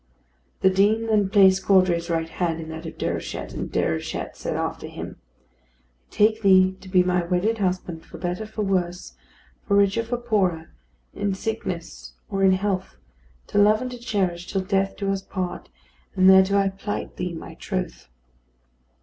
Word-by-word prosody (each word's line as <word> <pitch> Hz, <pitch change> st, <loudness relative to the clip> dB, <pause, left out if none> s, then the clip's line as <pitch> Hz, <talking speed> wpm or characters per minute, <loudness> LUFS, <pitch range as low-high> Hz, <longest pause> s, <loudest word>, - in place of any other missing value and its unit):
The 190 Hz, -, +5 dB
Dean 210 Hz, +4 st, +3 dB
then 210 Hz, -3 st, +2 dB
placed 190 Hz, -2 st, +5 dB
Caudray's 185 Hz, -3 st, +3 dB
right 165 Hz, -1 st, 0 dB
hand 165 Hz, -1 st, -2 dB
in 160 Hz, -1 st, -7 dB
that 160 Hz, +1 st, -7 dB
of -, -, -9 dB
Déruchette, -, -, -4 dB
and -, -, -4 dB
Déruchette 80 Hz, 0 st, -2 dB
said -, -, -4 dB
after -, -, -3 dB
him: -, -, -8 dB
"I -, -, -35 dB, 0.9 s
take 215 Hz, +1 st, +2 dB
thee 190 Hz, -2 st, +5 dB
to 190 Hz, -, -12 dB
be 185 Hz, -1 st, +4 dB
my 180 Hz, -1 st, +1 dB
wedded 185 Hz, +6 st, 0 dB
husband 180 Hz, -4 st, -2 dB
for -, -, -12 dB
better 180 Hz, +5 st, -3 dB
for 215 Hz, 0 st, -4 dB
worse, 180 Hz, -2 st, -2 dB, 0.5 s
for 200 Hz, -, +2 dB
richer 200 Hz, +2 st, +3 dB
for 240 Hz, +2 st, -3 dB
poorer, 195 Hz, -9 st, 0 dB, 0.4 s
in 200 Hz, -1 st, -1 dB
sickness 190 Hz, -5 st, -5 dB, 0.2 s
or 195 Hz, -1 st, 0 dB
in 190 Hz, -1 st, +6 dB
health, 190 Hz, -, -2 dB, 0.5 s
to 205 Hz, -, 0 dB
love 210 Hz, +1 st, +5 dB
and 255 Hz, 0 st, -4 dB
to 245 Hz, -, -8 dB
cherish 190 Hz, -7 st, -2 dB
till 195 Hz, -, 0 dB
death 195 Hz, 0 st, 0 dB
do 200 Hz, -1 st, -1 dB
us 195 Hz, -1 st, -2 dB
part; 185 Hz, -2 st, -5 dB, 0.5 s
and 185 Hz, 0 st, +4 dB
thereto 190 Hz, +1 st, +6 dB
I 195 Hz, -1 st, +3 dB
plight 195 Hz, +2 st, -5 dB
thee 180 Hz, -1 st, -3 dB
my 160 Hz, -, -8 dB
troth." -, -, -5 dB
190 Hz, 170 wpm, -24 LUFS, 180-205 Hz, 0.9 s, in